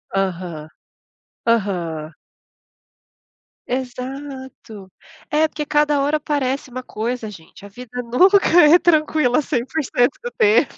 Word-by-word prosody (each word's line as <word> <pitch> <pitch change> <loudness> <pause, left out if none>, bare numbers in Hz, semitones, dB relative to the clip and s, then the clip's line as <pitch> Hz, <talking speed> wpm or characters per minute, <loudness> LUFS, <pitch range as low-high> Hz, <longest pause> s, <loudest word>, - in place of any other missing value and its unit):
Aham, 175 -5 -3 0.8
aham. 175 -9 -1 1.6
Exato, 255 -5 -7 0.4
é 310 +1 +2
porque 305 -1 -5
cada 295 -1 +2
hora 290 +2 +1
aparece 280 -3 -2
uma 255 +1 -5
coisa, 230 0 -4
gente, 185 0 -14
a - - -11
vida 245 +3 -7
nunca 360 +13 +4 0.3
é 310 +4 +7
tranquila, 310 -6 +2
100% 260 -1 -1
do 485 - -4
tempo. 440 -3 +3
255 Hz, 105 wpm, -20 LUFS, 215-295 Hz, 1.6 s, é